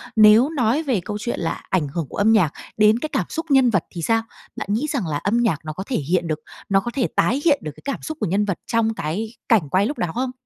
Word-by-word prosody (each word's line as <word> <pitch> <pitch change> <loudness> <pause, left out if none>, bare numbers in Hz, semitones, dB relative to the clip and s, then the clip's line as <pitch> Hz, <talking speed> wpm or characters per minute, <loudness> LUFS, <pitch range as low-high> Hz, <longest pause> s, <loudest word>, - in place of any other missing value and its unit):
nếu 220 +5 +7
nói 270 0 +1
về 255 - 0
câu 210 - -3
chuyện 240 +2 -3
là 165 - -3
ảnh 170 -6 +1
hưởng 155 +1 -4
của - - -8
âm 210 +2 +4
nhạc 185 -9 +3 0.2
đến 215 +2 +5
cái 310 - -4
cảm - - -1
xúc 325 - -4
nhân 265 -2 +5
vật 195 -7 +1
thì 175 - -6
sao? 225 +7 +2 0.3
Bạn - - -5
nghĩ 260 +8 0
rằng 255 - -1
là 150 -2 -1
âm 205 +9 0
nhạc 220 -11 +1
nó 155 - -4
có 185 - -5
thể 255 - -1
hiện 170 +4 0
được 155 -1 -2 0.3
nó 195 -1 +4
có 240 +5 -4
thể 260 -4 +1
tái 265 +6 +2
hiện 290 -4 +4
được 155 - -4
cái - - -16
cảm 280 - -3
xúc 315 - -6
của - - -1
nhân 200 +4 +1
vật 195 -5 -2
trong 225 -1 +1
cái 215 +6 -4 0.2
cảnh 200 - +3
quay 190 +5 +3
lúc 290 +6 -3
đó 175 - -1
không? 255 +1 -1
215 Hz, 280 wpm, -22 LUFS, 175-245 Hz, 0.3 s, nếu